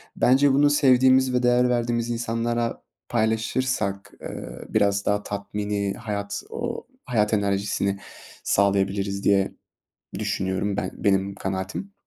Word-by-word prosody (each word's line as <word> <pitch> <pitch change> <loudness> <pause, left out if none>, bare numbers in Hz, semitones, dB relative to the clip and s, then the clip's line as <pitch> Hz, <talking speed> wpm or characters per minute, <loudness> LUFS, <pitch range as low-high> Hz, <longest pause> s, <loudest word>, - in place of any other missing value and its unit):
bence 135 +2 +4
bunu 145 +2 +5
sevdiğimiz 130 -2 +4
ve 125 0 +1
değer 125 0 +4
verdiğimiz 120 -1 0
insanlara 115 0 -2 0.3
paylaşırsak, 110 -2 -1
ııı, - - -7
biraz 100 0 +2
daha 105 0 +1
tatmini, 100 0 -3
hayat 100 -3 -4
o 240 0 -4 0.2
hayat 110 -3 +1
enerjisini 100 -1 0 0.4
sağlayabiliriz 100 0 +1
diye 100 -1 +3 0.7
düşünüyorum 95 +1 -1
ben, - - -2
benim 100 0 +1
kanaatim. 95 - -4
105 Hz, 110 wpm, -24 LUFS, 100-125 Hz, 0.7 s, bunu